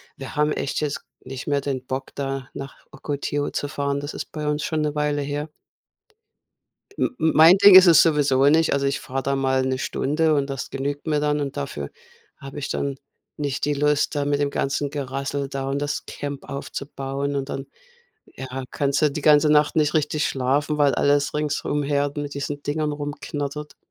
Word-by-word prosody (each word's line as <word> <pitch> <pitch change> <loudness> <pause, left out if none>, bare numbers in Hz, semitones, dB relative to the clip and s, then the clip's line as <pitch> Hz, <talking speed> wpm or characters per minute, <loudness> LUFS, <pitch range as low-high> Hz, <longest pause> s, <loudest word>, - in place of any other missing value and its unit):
Wir 135 +3 -8
haben 150 0 +2
echt - - -2
jetzt 150 -2 -2 0.2
nicht 130 0 -7
mehr 145 -1 +2
den 135 -2 -4
Bock, 130 +1 -5
da 135 -2 -3
nach 135 0 -9
Ocotillo 145 0 -3
zu 145 - -3
fahren. 140 0 -2
Das 145 +1 -6
ist - - -6
bei 150 -1 -4
uns 150 0 0
schon 155 -1 -1
'ne 150 0 -1
Weile 150 -1 0
her. 145 +2 -3 1.5
M - - +2
m 160 - +2
mein 165 +4 +8
Ding 200 -1 +8
ist 185 0 +10
es 165 -3 +8
sowieso 145 -4 +3
nicht. 160 +2 +4
Also, 140 0 +1
ich 140 - -1
fahre 135 +1 -4
da 140 0 0
mal 130 -1 +1
'ne 130 0 -1
Stunde 155 +4 +1
und 140 -1 0
das 135 -2 -5
genügt 145 +3 -4
mir 150 -2 +1
dann. 150 0 +1
Und 140 -2 -4
dafür 70 0 -4 0.5
habe 135 +1 -9
ich 140 - -4
dann 140 -1 -2 0.4
nicht 140 -2 -2
die 145 - +1
Lust, 150 +1 +1
da 145 -1 0
mit 145 0 0
dem 145 - +2
ganzen 140 +1 -1
Gerassel 140 0 -3
da 135 -1 -4
und 140 - -1
das 145 0 -3
Camp 145 -1 -6
aufzubauen. 140 0 -4
Und 135 0 -3
dann 135 0 -5 0.6
ja, 130 0 -7
kannst 140 +1 0
du 150 - +4
die 150 - -4
ganze 150 0 +5
Nacht 150 0 +3
nicht 150 -1 +2
richtig 150 0 +1
schlafen, 140 +3 0
weil 145 -2 +4
alles 145 0 +2
ringsumher 145 -1 0
mit 145 -1 -4
diesen 145 0 -4
Dingern 150 0 -1
rumknattert. 145 0 -5
145 Hz, 195 wpm, -23 LUFS, 140-150 Hz, 1.5 s, ist